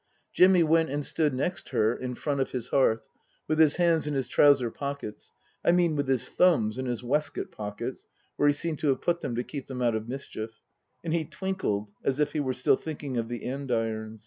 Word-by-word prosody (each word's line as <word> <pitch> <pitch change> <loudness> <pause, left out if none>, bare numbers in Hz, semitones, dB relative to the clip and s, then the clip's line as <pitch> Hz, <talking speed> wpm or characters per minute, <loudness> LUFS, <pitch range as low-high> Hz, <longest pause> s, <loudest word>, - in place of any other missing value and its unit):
Jimmy 185 -1 +6
went 160 0 +3
and 145 +1 -2
stood 155 -2 +1
next 140 +8 -3
her 110 +2 +2
in 125 -1 -5
front 140 0 -1
of 135 - -1
his 125 -3 -3
hearth, 115 -5 +2 0.4
with 155 0 0
his 155 -2 +6
hands 170 -3 +2
in 150 - -1
his 135 -2 -1
trouser 135 -5 +4
pockets 140 -6 -6 0.3
I - - +5
mean 175 -3 +3
with 145 -2 -1
his 130 -3 +1
thumbs 130 -11 +3
in 130 - -2
his 120 -1 -3
waistcoat 145 +5 -1
pockets, 105 -1 -6 0.3
where 145 - +2
he 145 - +5
seemed 160 0 -3
to 155 - -1
have 135 - +2
put 170 0 0
them 120 - -3
to 120 - -1
keep 140 +1 -7
them 130 -2 -6
out 120 -1 +3
of 110 +1 -3
mischief; 115 -4 -6 0.4
and 165 -1 -2
he 170 -1 +1
twinkled 145 - -3
as 135 +1 0
if 150 0 +1
he 155 - -1
were 130 -3 0
still 130 +1 +3
thinking 145 -5 -5
of 115 -1 -2
the 120 -1 -5
andirons. 115 -5 -2
135 Hz, 220 wpm, -28 LUFS, 120-155 Hz, 0.4 s, Jimmy